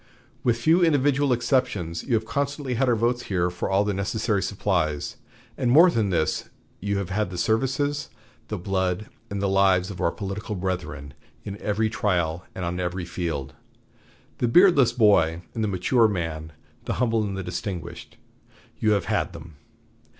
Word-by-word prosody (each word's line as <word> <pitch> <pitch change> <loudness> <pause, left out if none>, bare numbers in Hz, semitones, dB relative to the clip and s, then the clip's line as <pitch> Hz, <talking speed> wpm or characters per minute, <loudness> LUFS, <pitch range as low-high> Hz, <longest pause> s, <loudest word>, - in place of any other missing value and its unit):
With 120 -2 +2
few 160 +9 +3
individual 145 -3 +3
exceptions, 120 - 0
you 125 - +1
have 110 0 0
constantly 140 +1 -2
had 125 +2 +1
our 120 - +4
votes 120 +2 0
here 90 -2 0
for 90 - -3
all 95 +1 +3
the 105 0 -1
necessary 100 +1 -1
supplies. 85 -8 -1 0.4
And, 125 - +1
more 165 +8 +7
than 110 -7 +1
this, 85 -4 0 0.3
you 100 +1 -1
have 100 -3 -3
had 105 0 0
the 90 - -6
services, 135 +9 0 0.4
the - - -3
blood, 95 +2 -1 0.2
and 100 0 -3
the - - +2
lives 95 -1 +3
of 95 - -7
our - - +3
political 100 +4 -5
brethren 75 -7 -4 0.3
in 100 - -6
every 105 +1 0
trial 90 -6 0
and 90 - -3
on 90 +1 -3
every 90 0 -2
field. 80 -6 -4 0.9
The 120 - +2
beardless 150 -2 +6
boy 100 -8 +3
and 110 - -2
the - - +1
mature 105 +5 +3
man, 80 -5 -3 0.3
the - - -1
humble 115 -2 +1
and 100 -2 -3
the 95 - -3
distinguished 90 0 -6 0.6
you 110 -1 +3
have 100 -4 0
had - - -1
them. 80 0 -10
100 Hz, 170 wpm, -25 LUFS, 90-120 Hz, 0.9 s, more